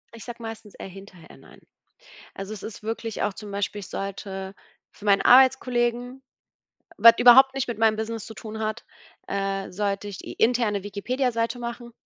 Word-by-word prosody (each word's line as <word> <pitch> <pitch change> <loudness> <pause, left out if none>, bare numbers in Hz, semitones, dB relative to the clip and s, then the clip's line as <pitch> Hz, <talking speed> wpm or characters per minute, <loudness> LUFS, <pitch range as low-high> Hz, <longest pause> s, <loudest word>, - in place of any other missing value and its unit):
Ich 230 - -11
sage 240 -1 -8
meistens 225 -2 -9
eher - - -8
hinterher 185 -3 -14
nein. - - -18 0.8
Also, 195 +2 -7
es 215 - -8
ist 215 -1 -8
wirklich 225 0 -4
auch 205 - 0
zum 210 0 -9
Beispiel, 200 +1 -3
ich 190 - -10
sollte 195 0 -6 0.4
für 210 - -11
meinen 200 -1 +4
Arbeitskollegen, 250 -1 +3 0.7
was 230 0 +8
überhaupt 265 +2 +8
nicht 270 -1 -2
mit 230 -3 -4
meinem 220 -1 +3
Business 220 0 -4
zu 220 - -10
tun 220 0 -8
hat 220 +1 -3 0.4
äh, 195 0 -2
sollte 200 +1 -2
ich 195 - -8
die - - -8
interne 225 -4 +1
Wikipedia-Seite 230 +4 -2
machen 235 0 -7
220 Hz, 170 wpm, -25 LUFS, 200-240 Hz, 0.8 s, was